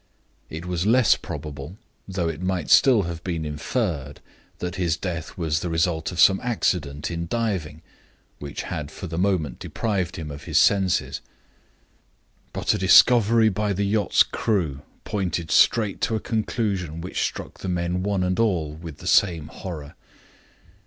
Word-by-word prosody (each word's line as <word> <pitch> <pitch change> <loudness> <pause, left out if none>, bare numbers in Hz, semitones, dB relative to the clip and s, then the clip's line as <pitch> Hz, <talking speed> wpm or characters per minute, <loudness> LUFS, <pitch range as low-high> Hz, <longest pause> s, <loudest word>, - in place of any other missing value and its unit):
It 80 +2 -7
was 90 +1 -2
less 125 +1 +5
probable 75 +4 -7 0.3
though 90 -3 -2
it 80 +1 -4
might 90 -3 -2
still 115 -1 +6
have 85 -1 -6
been 85 -4 -3
inferred 75 - -3 0.4
that 90 0 -4
his 85 -3 0
death 85 -1 -5
was 80 -3 0
the 90 - -4
result 80 0 0
of 90 - -6
some 95 -1 +6
accident 85 -11 -1
in 85 0 -4
diving, 90 -9 -2 0.6
which 70 -1 -6
had 75 -2 -5
for 85 - -8
the 80 -1 -4
moment 90 -9 0
deprived 95 -5 -2
him 80 -4 -6
of 70 0 -9
his - - 0
senses. 95 -3 +2 1.3
But - - 0
a - - -2
discovery 115 +3 +6
made - - -4
by 105 +1 0
the 100 +2 -1
yacht's 105 +1 +3
crew 80 -11 -1 0.2
pointed 90 -5 -2
straight 105 -4 +3
to 140 -7 +1
a - - 0
conclusion 100 -8 -2
which 90 - -3
struck - - -4
the 95 - -4
men, 90 0 -1
one 100 -1 0
and 90 +2 0
all, 90 -10 +1
with 80 -1 -9
the - - -12
same 85 -5 +3
horror. 80 -5 -8
90 Hz, 160 wpm, -24 LUFS, 80-100 Hz, 1.3 s, still